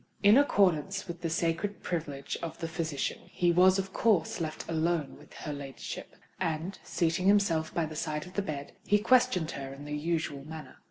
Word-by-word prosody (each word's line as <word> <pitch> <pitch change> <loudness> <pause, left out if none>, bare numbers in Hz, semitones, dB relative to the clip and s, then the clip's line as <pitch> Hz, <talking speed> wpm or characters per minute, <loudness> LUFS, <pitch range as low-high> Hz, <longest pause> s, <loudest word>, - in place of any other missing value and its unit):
In 205 +2 +8
accordance 195 - +3
with 170 0 -6
the 165 - -1
sacred 170 +5 -1
privilege 145 -5 -3
of 165 - -5
the 165 - -3
physician, 160 -3 -2
he 175 -2 +1
was 185 +2 +6
of 195 0 -3
course 195 -8 +2
left 155 -1 -4
alone 165 -2 0
with 150 - -17
her 150 - -5
ladyship; 140 -2 -7 0.2
and, 165 +4 -2
seating 175 +2 0
himself 195 -6 +3
by 170 - 0
the 155 0 -7
side 150 -1 -2
of 180 - -12
the 200 - 0
bed, 145 -7 -5
he 205 - +4
questioned 230 -6 +3
her 135 -1 -6
in 140 +1 -9
the 150 0 -3
usual 155 -2 -2
manner. 155 -3 -9
165 Hz, 185 wpm, -30 LUFS, 155-190 Hz, 0.2 s, In